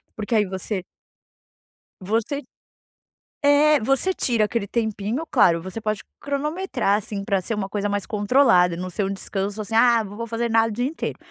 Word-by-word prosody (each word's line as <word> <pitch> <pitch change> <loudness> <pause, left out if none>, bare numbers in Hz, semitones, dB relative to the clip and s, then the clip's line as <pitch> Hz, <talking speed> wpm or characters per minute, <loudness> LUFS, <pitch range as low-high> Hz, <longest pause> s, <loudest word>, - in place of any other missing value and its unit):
Porque 220 +2 -2
aí 210 -1 +4
você 190 0 -4 1.2
você 225 +9 -1 1.0
é, 290 +1 +5
você 270 +11 +1
tira 235 -10 +1
aquele 210 -1 -2
tempinho 220 +5 -2
claro, 175 -9 +4
você 190 +4 -6
pode 215 -1 -2 0.2
cronometrar, 285 - -1
assim, 205 -1 -5
pra 195 -1 0
ser 225 +5 -3
uma 200 -2 -2
coisa 205 0 -2
mais 205 -1 -2
controlada, 205 -5 +3
não 185 +1 -4
ser 185 +3 -2
um 195 - -2
descanso, 200 +1 -4
assim: 220 +2 -4
"Ah, 230 0 +5
não 205 -1 -9
vou 230 +2 -5
fazer 230 +1 -2
nada 225 0 +4
o - - -5
dia 240 +4 -1
inteiro". 300 +5 -4
215 Hz, 175 wpm, -23 LUFS, 200-245 Hz, 1.2 s, é